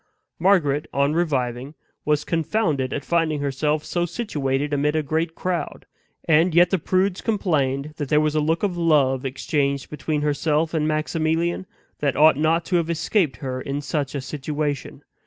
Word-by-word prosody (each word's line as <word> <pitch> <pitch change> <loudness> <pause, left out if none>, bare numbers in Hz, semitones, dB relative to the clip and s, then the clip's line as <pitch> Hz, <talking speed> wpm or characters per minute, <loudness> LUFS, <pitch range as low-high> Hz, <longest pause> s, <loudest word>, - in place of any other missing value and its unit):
Margaret, 160 -6 +2
on 140 +2 +1
reviving, 135 -4 -1 0.3
was 150 0 +1
confounded 160 - 0
at 140 - -4
finding 165 -3 +1
herself 150 +2 -1
so 175 -1 -1
situated 145 - -2
amid 150 +2 +1
a 155 - +1
great 160 +3 -1
crowd; 175 -4 -3 0.4
and 165 +2 +4
yet 175 0 +5
the 190 - +2
prudes 185 +3 0
complained 150 -9 0
that 145 -3 -4
there 150 - +4
was 155 0 +1
a 155 - +2
look 160 +4 0
of 195 -3 0
love 145 -6 +2
exchanged 140 +1 -1
between 150 0 -2
herself 150 +2 0
and 155 -2 +1
Maximilian, 160 +3 -1 0.3
that 140 -3 0
ought 155 +1 +6
not 160 +3 +1
to 180 - +1
have 165 -1 -1
escaped 170 -1 0
her 130 0 -3
in 140 +2 -3
such 140 0 -3
a 140 - -2
situation. 145 0 -4
150 Hz, 165 wpm, -23 LUFS, 140-165 Hz, 0.4 s, ought